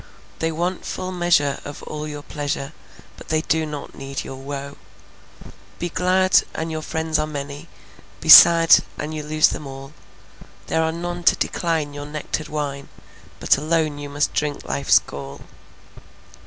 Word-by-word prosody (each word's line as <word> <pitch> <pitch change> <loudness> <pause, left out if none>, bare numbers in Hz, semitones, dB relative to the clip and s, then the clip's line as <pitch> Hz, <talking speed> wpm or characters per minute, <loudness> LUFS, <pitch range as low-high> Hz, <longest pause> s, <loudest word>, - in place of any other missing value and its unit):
They 165 0 0
want 175 +3 -2
full 185 0 -5
measure 175 -6 +1
of 145 - -9
all 150 0 -6
your 145 -1 -7
pleasure, 145 -2 -4 0.4
But - - -13
they 155 0 +1
do 160 0 0
not 150 -2 -7
need 135 0 -6
your 135 - -8
woe. 140 +1 -7 1.0
Be 175 - -3
glad, 185 +2 +3
and 160 +1 -3
your 155 0 -4
friends 160 0 -2
are 155 - -1
many; 145 +1 -7 0.5
Be 160 - -8
sad, 165 +1 +9 0.2
and 155 +1 -5
you 155 - -4
lose 155 +1 +3
them 150 - -6
all. 135 +1 -10 0.7
There 160 - 0
are 160 0 +1
none 175 +1 -5
to - - +6
decline 160 -4 -2
your 145 0 -7
nectared 150 +1 -4
wine, 140 -2 -4 0.5
But - - +3
alone 155 -1 0
you 145 0 -7
must 145 +1 -1
drink 150 -1 -2
life's 140 - +3
gall. 70 0 -6
150 Hz, 160 wpm, -22 LUFS, 145-165 Hz, 1.0 s, sad